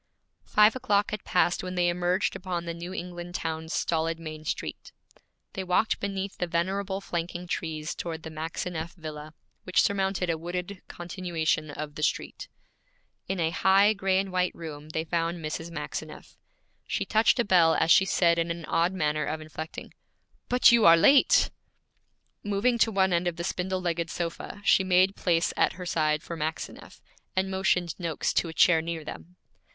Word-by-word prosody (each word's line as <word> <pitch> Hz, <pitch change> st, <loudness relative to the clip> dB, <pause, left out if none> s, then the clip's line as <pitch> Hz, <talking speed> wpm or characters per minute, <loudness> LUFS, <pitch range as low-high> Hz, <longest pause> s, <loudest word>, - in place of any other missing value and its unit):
Five 210 Hz, +2 st, +5 dB
o'clock 205 Hz, -5 st, +1 dB
had 210 Hz, -1 st, -4 dB
passed 180 Hz, -1 st, +2 dB
when 185 Hz, 0 st, -5 dB
they 175 Hz, -1 st, +2 dB
emerged 180 Hz, +2 st, 0 dB
upon 180 Hz, -2 st, -4 dB
the 170 Hz, -, -3 dB
New 170 Hz, +2 st, -7 dB
England 175 Hz, -1 st, -6 dB
town's 160 Hz, -1 st, -4 dB
stolid 165 Hz, -1 st, 0 dB
main 155 Hz, -1 st, -8 dB
street. -, -, -5 dB, 0.6 s
They 190 Hz, -, -4 dB
walked 185 Hz, +4 st, +1 dB
beneath 195 Hz, -1 st, -4 dB
the 180 Hz, -, -1 dB
venerable 190 Hz, +3 st, -1 dB
flanking 175 Hz, -1 st, -4 dB
trees 160 Hz, -2 st, -3 dB
toward 165 Hz, -2 st, -5 dB
the 160 Hz, -, -7 dB
Maxineff 165 Hz, +2 st, -5 dB
villa, 155 Hz, -2 st, -8 dB, 0.3 s
which 185 Hz, -, +2 dB
surmounted 195 Hz, -2 st, 0 dB
a 160 Hz, -, -3 dB
wooded 180 Hz, +3 st, -5 dB
continuation 170 Hz, -3 st, -2 dB
of 150 Hz, 0 st, -6 dB
the 150 Hz, -, -7 dB
street. 150 Hz, -, -2 dB, 0.8 s
In 190 Hz, 0 st, -2 dB
a 160 Hz, -1 st, +1 dB
high 195 Hz, +5 st, +4 dB
gray 190 Hz, -2 st, +1 dB
and 195 Hz, 0 st, -1 dB
white 180 Hz, 0 st, 0 dB
room 155 Hz, -2 st, -8 dB
they 160 Hz, 0 st, -2 dB
found 170 Hz, +1 st, -1 dB
Mrs. 160 Hz, +1 st, -5 dB
Maxineff. 170 Hz, -, -7 dB, 0.5 s
She -, -, -1 dB
touched 220 Hz, +3 st, +3 dB
a 240 Hz, -, +3 dB
bell 170 Hz, -4 st, +5 dB
as 165 Hz, -, +2 dB
she 190 Hz, -, +7 dB
said 170 Hz, -2 st, +3 dB
in 165 Hz, 0 st, 0 dB
an 170 Hz, -1 st, -4 dB
odd 170 Hz, +4 st, +1 dB
manner 150 Hz, -4 st, 0 dB
of 155 Hz, +1 st, -3 dB
inflecting, 155 Hz, +1 st, -8 dB, 0.6 s
'But 250 Hz, 0 st, +6 dB
you 235 Hz, -2 st, +5 dB
are 165 Hz, 0 st, +8 dB
late!' 275 Hz, +11 st, +5 dB, 0.9 s
Moving 205 Hz, +4 st, +1 dB
to 225 Hz, -, +4 dB
one 190 Hz, -2 st, +2 dB
end 175 Hz, +1 st, +1 dB
of 175 Hz, -, -1 dB
the 170 Hz, -, -5 dB
spindle 185 Hz, +1 st, -2 dB
legged 170 Hz, -2 st, -1 dB
sofa, 170 Hz, +5 st, -5 dB
she 190 Hz, -, +5 dB
made 185 Hz, +1 st, +3 dB
place 170 Hz, -2 st, +1 dB
at -, -, +2 dB
her 180 Hz, 0 st, -8 dB
side 155 Hz, -2 st, 0 dB
for 170 Hz, -, -6 dB
Maxineff, 160 Hz, 0 st, -6 dB, 0.3 s
and 190 Hz, 0 st, 0 dB
motioned 180 Hz, -3 st, +1 dB
Noakes 165 Hz, -4 st, -1 dB
to -, -, +1 dB
a -, -, -7 dB
chair 165 Hz, -1 st, +5 dB
near 165 Hz, -1 st, -4 dB
them. 175 Hz, +4 st, -9 dB
175 Hz, 175 wpm, -27 LUFS, 160-190 Hz, 0.9 s, are